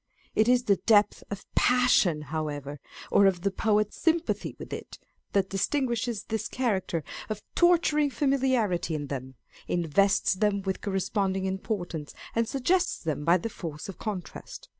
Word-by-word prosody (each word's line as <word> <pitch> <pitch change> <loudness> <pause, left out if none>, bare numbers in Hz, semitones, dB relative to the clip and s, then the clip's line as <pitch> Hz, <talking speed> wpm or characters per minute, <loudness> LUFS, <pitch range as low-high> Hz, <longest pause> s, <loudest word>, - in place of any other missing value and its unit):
It 215 - +3
is 250 0 +4
the 200 -5 +3
depth 210 -2 +3
of 200 -1 -6
passion, 245 -11 +3
however, 145 -2 -4 0.3
or 200 - +6
of 180 -3 +1
the 200 +2 0
poet's 210 +1 0
sympathy 330 +1 0
with - - -8
it, - - -7 0.4
that 195 -1 +1
distinguishes 240 +1 -1
this 220 0 -3
character 195 -10 -1 0.3
of 215 -1 -4
torturing 330 -4 +4
familiarity 255 - +1
in 145 -2 -4
them, 130 0 -6 0.3
invests 175 +5 +2
them 200 0 0
with 190 -1 -2
cor 205 - -3
responding 190 0 0
importance, 190 -5 -4 0.2
and 230 0 +1
suggests 345 +9 +1
them 155 -3 -3
by 170 +3 +5
the 185 - -4
force 160 -8 -7
of 195 - -9
contrast. 200 -5 -6
200 Hz, 150 wpm, -28 LUFS, 175-240 Hz, 0.4 s, or